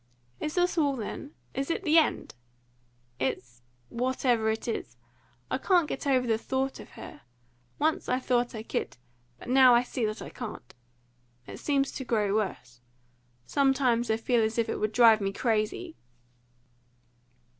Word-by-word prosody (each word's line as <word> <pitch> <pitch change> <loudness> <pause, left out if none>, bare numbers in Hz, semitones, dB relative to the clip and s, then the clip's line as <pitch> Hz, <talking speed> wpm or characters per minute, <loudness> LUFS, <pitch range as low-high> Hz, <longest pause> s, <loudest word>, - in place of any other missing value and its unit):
"Is 305 - -3
this 355 -1 +2
all, 285 -3 +2
then? 260 +5 -6 0.2
Is 275 +3 -3
it 335 - -1
the 325 -1 +6
end?" 315 - -1 0.9
"It's 125 -2 -3 0.3
whatever 245 -2 0
it 220 +2 -2
is. 120 - -4 0.5
I - - 0
can't 350 0 +3
get 275 - -4
over 260 -2 +3
the 225 -2 +1
thought 265 +2 -2
of - - -11
her. - - -11 0.6
Once 315 +1 0
I 250 - +2
thought 245 -2 0
I 220 - -5
could, 220 - -4 0.4
but - - -12
now 255 -1 +7
I 240 - +4
see 245 -1 -4
that 215 +1 -4
I - - -8
can't. 215 - -8 0.7
It - - -9
seems 275 -2 0
to 265 - -5
grow 210 -5 0
worse. 125 - -3 0.6
Sometimes 260 - +2
I 220 - +2
feel 235 +1 +1
as 220 +1 -1
if 230 -1 +1
it - - -2
would 215 0 0
drive 225 -2 +6
me 195 0 -1
crazy." 225 - -1
245 Hz, 160 wpm, -28 LUFS, 220-270 Hz, 0.9 s, now